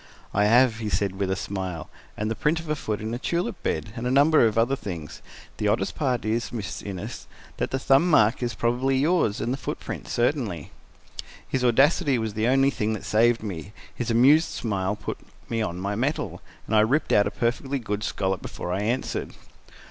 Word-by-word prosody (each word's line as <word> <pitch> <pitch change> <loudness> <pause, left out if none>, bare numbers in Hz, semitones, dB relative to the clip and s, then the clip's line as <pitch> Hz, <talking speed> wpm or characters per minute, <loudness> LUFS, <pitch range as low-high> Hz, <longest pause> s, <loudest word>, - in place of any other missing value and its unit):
"I 105 +1 +3
have," 120 +1 +5
he 110 -2 -3
said 100 -2 -1
with 100 -1 0
a 95 - +1
smile, 95 -4 -4 0.3
"and 105 +1 -2
the - - -1
print 150 +9 +1
of 165 - -9
a 155 - 0
foot 110 -8 -3
in 110 +1 -3
a 120 - -3
tulip 170 -4 -2
bed, 105 - -2
and 125 0 -3
a - - +1
number 140 0 +5
of 110 0 -2
other 120 +4 +3
things. 85 - -7 0.4
The 105 - 0
oddest 105 +3 +1
part 130 -7 -1
is, 115 +2 -1
Miss 110 -6 -5
Innes, 95 -3 -7 0.3
that - - -1
the 130 - -1
thumb 135 +6 +3
mark 115 -6 +4
is 120 -1 -2
probably 125 +3 +1
yours 145 - +2
and 120 - -1
the - - -3
footprint - - -6
certainly." 120 - -1 0.8
His 130 -1 -1
audacity 135 +2 +4
was 110 -2 -2
the 110 +2 0
only 135 +2 +4
thing 110 -4 -1
that 110 - -6
saved 115 +1 +3
me: 100 -1 -6 0.2
his 120 - -4
amused 140 +8 +5
smile 100 -3 -2
put - - -6 0.3
me 115 -1 -1
on 90 -4 -3
my 100 +2 -2
mettle, 130 +9 -2 0.2
and 110 - -1
I - - +6
ripped 130 +9 +2
out 105 - +5
a - - 0
perfectly 125 +3 -1
good 105 -4 -3
scallop 95 -4 -1
before 90 - -5
I 95 - -1
answered. 120 +5 -2
115 Hz, 205 wpm, -25 LUFS, 105-130 Hz, 0.8 s, I